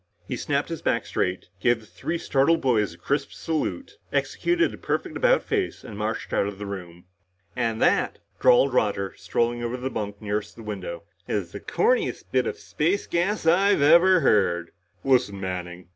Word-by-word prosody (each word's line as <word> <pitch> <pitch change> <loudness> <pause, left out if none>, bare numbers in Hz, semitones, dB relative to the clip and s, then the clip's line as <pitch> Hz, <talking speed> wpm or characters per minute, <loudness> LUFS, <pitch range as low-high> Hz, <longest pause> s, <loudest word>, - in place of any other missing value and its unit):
He - - -2
snapped - - -1
his - - -5
back - - 0
straight, 90 0 -2
gave 120 +4 +3
the 110 - -16
three 135 - -4
startled 160 +2 +2
boys 105 -9 +1
a - - -20
crisp 140 +11 -1
salute, 275 - -3
executed 345 -1 +1
a - - -8
perfect - - -2
about - - +3
face 400 -4 -2
and 105 - -9
marched 110 +2 -3
out 100 - +2
of 100 -1 -6
the 105 - -6
room. 90 -3 -8 0.5
"And 115 -3 -1
that," - - +2 0.2
drawled 130 +2 +5
Roger, 100 -5 +1
strolling 120 +7 -1
to 120 +1 -2
the 130 +1 -4
bunk 100 -1 -4
nearest 105 -1 -3
the 115 - -11
window, 95 -4 -6 0.2
"is 95 -5 -2
the 100 - -7
corniest 470 - 0
bit - - +2
of 450 -1 -3
space 190 - -1
gas 175 +3 0
I've 185 0 +4
ever 170 +4 +6
heard." 90 - +2 0.3
"Listen, 125 -7 +2
Manning!" 90 -2 -5
115 Hz, 175 wpm, -25 LUFS, 100-165 Hz, 0.5 s, ever